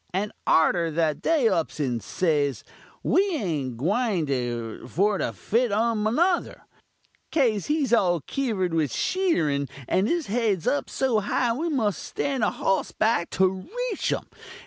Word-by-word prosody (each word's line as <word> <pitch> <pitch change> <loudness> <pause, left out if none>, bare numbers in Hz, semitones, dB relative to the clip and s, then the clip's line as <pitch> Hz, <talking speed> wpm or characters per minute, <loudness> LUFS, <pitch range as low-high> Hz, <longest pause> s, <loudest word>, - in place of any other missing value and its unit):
And 205 +2 -1 0.2
arter 165 +1 +3
that 155 -1 0
they 305 -8 +3
ups 170 -7 -1
and 125 -5 -1
says, 145 -6 0 0.4
'We - - +4
ain't 155 - -2
a - - -6
gwying 140 - -1
for 200 +6 +1
to - - -1
fite 235 +1 0
um 220 +1 +1
nuther, 350 +3 +1 0.7
'caze 230 - +1
he's 295 -5 +1
all 175 -7 +3
kiver'd 205 - -2
with 155 -4 +1
sheetirun, 155 - 0 0.2
and 190 +3 +2
his 340 +1 0
head's 210 -5 0
up 140 -1 0
so 255 -5 +1
high 230 +3 0
we 320 +8 -2
muss 225 - 0
stand 270 -5 -2
a - - +3
hoss 195 - -1
back 215 -6 +1
to 190 0 +3 0.4
reach 410 - -1
um!' - - -2
200 Hz, 150 wpm, -25 LUFS, 155-245 Hz, 0.7 s, We